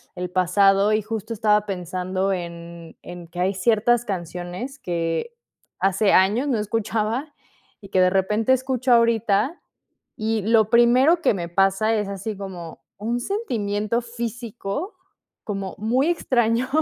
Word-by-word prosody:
el 180 -1 -5
pasado. 195 +3 +3
Y 215 0 +1
justo 220 +1 -4
estaba 210 -1 +2
pensando 185 +1 -2
en 170 -2 -8
en 175 -1 -9
que 175 +2 -9
hay 190 +2 +1
ciertas 225 +4 +2
canciones 180 - -5
que 170 - -3 0.4
hace 195 +1 +2
años 210 +9 +3
no 255 -5 +1
escuchaba, 225 +6 -2 0.4
y 195 - -13
que 185 - +2
de 185 - +5
repente 210 +6 +1
escucho 260 0 0
ahorita. 230 - +2 0.6
Y 220 0 -1
lo 220 0 +3
primero 255 +8 +5
que 330 - +3
me 170 -2 -4
pasa 195 +5 +2
es 210 -2 -1
así 200 +2 -5
como 180 -4 -8 0.2
un 230 +4 -2
sentimiento 230 - -2
físico 235 - -5 0.5
como 195 -3 -5
muy 245 +7 +1
extraño 240 -7 +1
210 Hz, 135 wpm, -23 LUFS, 190-235 Hz, 0.6 s, de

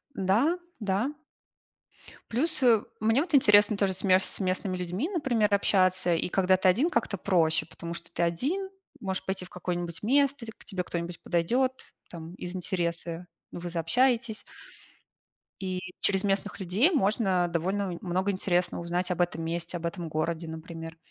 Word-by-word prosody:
Да, 225 - +2 0.2
да. 205 +6 0 1.2
Плюс, 305 +4 +1
э, 230 -4 +5 0.2
мне 225 +5 +3
вот 330 -3 0
интересно 210 -4 +6
тоже 195 -2 +1
с 190 - -4
ме 185 -1 +5
с 190 - -3
местными 185 0 -1
людьми, 180 - -2
например, 240 - +1
общаться, 185 -3 +3
и 170 - -1
когда 185 0 +3
ты 190 - +2
1, 250 - +4
как-то 225 - -1
проще, 165 -4 +2
потому 170 0 -7
что 170 -1 -7
ты 170 - -1
1 290 - -1 0.3
можешь 190 -2 -3
пойти 190 -1 -3
в - - -14
какое-нибудь 175 -2 -4
место, 275 +1 +2
к 220 - -10
к - - -16
тебе 185 -4 -3
кто-нибудь 170 0 -5
подойдет, 250 +10 0 0.2
там, 165 0 -9
из 180 0 -6
интереса, 170 -1 -2 0.2
вы 175 0 -6
заобщаетесь. 225 +7 +1 1.1
И 185 -1 -3 0.2
через 195 -1 +3
местных 200 +1 -1
людей 200 - +2
можно 195 - +2
довольно 185 +3 -1
нь - - -6
много 185 +2 0
интересного 180 -2 0
узнать 175 +2 -2
об 180 0 0
этом 165 -2 -1
месте, 170 +1 -3
об 170 - -6
этом 170 -1 -4
городе, 160 +2 -2
например. 165 0 -8
185 Hz, 160 wpm, -28 LUFS, 175-220 Hz, 1.2 s, интересно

